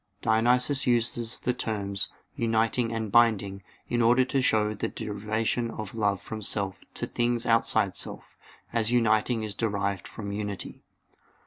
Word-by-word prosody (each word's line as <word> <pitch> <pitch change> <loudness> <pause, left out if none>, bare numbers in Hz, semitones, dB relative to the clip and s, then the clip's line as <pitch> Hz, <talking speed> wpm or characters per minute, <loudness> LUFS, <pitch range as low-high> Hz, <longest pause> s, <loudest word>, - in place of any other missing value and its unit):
Dionysius 125 +5 +3
used 120 -1 0
the 125 - +1
terms 100 -5 -2 0.2
"uniting" 115 +1 +1
and 110 -2 -3
"binding" 100 -4 +3 0.3
in 120 - 0
order 120 +3 +5
to 135 +1 0
show 110 -3 +2
the 105 - -2
derivation 110 +3 -2
of 110 -4 -6
love 100 -3 +1
from 110 +2 -7
self 100 -2 -2
to - - -2
things 120 0 0
outside 115 0 +2
self; - - -4 0.4
as 115 -1 +1
uniting 115 -1 +2
is 105 -2 -3
derived 100 -4 -1
from 100 -2 -6
unity. 100 -1 -5
110 Hz, 140 wpm, -27 LUFS, 105-120 Hz, 0.4 s, order